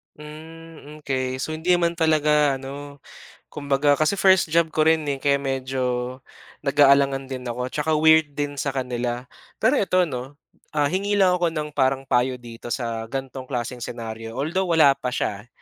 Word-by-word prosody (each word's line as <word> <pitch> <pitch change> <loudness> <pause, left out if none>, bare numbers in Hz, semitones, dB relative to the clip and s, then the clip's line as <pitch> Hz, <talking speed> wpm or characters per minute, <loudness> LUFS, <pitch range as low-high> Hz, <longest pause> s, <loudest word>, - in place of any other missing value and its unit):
Hmm, 155 0 -12
okey 130 -2 -2
so, 155 - -3
hindi 170 +3 +2
man 170 -1 +1
talaga 150 -3 +3
ano 140 +2 -9 0.5
kumbaga 145 0 +1
kasi 155 +4 +2
first 190 -4 +4
job 170 0 +3
ko 155 - +3
rin 160 -1 +2 0.2
kaya 140 -1 +3
medyo 130 -2 -2 0.4
nag-aalangan 140 -1 +3
din 130 -1 -6
ako 120 +1 -4
at - - -7 0.2
weird 160 -1 +4
din 145 -1 -3
sa - - -2
kanila 125 -1 -3 0.3
pero 235 +6 +2
eto 185 -2 +2
'no 135 -2 -6 0.4
hingi 185 +8 0
lang 190 -2 +4
ako 175 -1 +1
ng 155 -2 -4
parang 135 -1 +1
payo 125 0 +1
dito 120 -1 -10
sa 115 -2 -3
gantong 135 0 -6
klaseng 125 -1 -4
senaryo 115 -1 -7
although 170 +7 -1
wala 160 -4 +5
pa 135 -2 -5
siya 105 -3 -3
140 Hz, 160 wpm, -23 LUFS, 130-155 Hz, 0.5 s, wala